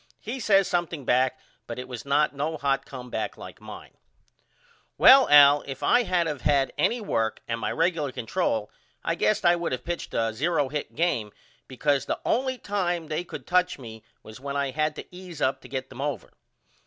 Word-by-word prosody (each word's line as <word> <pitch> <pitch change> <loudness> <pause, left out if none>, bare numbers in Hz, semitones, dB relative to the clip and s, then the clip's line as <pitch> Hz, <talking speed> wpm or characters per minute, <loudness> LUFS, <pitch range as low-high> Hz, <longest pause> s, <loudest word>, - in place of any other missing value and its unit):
He 240 +5 -5
says 195 -4 +3
something 170 -5 -2
back 130 +1 +2 0.3
but 115 - -6
it 125 0 -6
was 125 -1 -8
not 145 +2 +2
no 150 +3 -2
hot 135 -2 -1
comeback 125 -2 -5
like - - -11
mine. - - -11 1.0
Well 270 0 +8
Al 145 0 +8
if 135 -1 -7
I 245 - +4
had 180 -6 +1
of 150 -4 -4
had 140 -2 +2
any 240 - +1
work 115 - -1
and 115 0 -2
my - - -2
regular 165 -4 0
control 115 - -2 0.3
I - - 0
guess 105 +10 +1
I 175 0 +6
would 170 -5 -3
of 125 - -5
pitched 175 0 -5
a 115 -1 0
0 145 +2 0
hit 150 0 -5
game 130 -11 0 0.4
because 140 +2 0
the - - -2
only 260 +2 0
time 175 -7 -2
they 155 +3 -2
could - - -9
touch 180 0 +1
me 110 -4 -11 0.2
was 110 +3 -11
when 140 +1 -5
I 140 -1 -1
had 155 +2 -1
to - - -7
ease 180 -4 -10
up 135 -1 0
to 125 - -13
get 130 0 -4
them 130 - -8
over. 140 -5 -4
145 Hz, 195 wpm, -26 LUFS, 130-175 Hz, 1.0 s, Well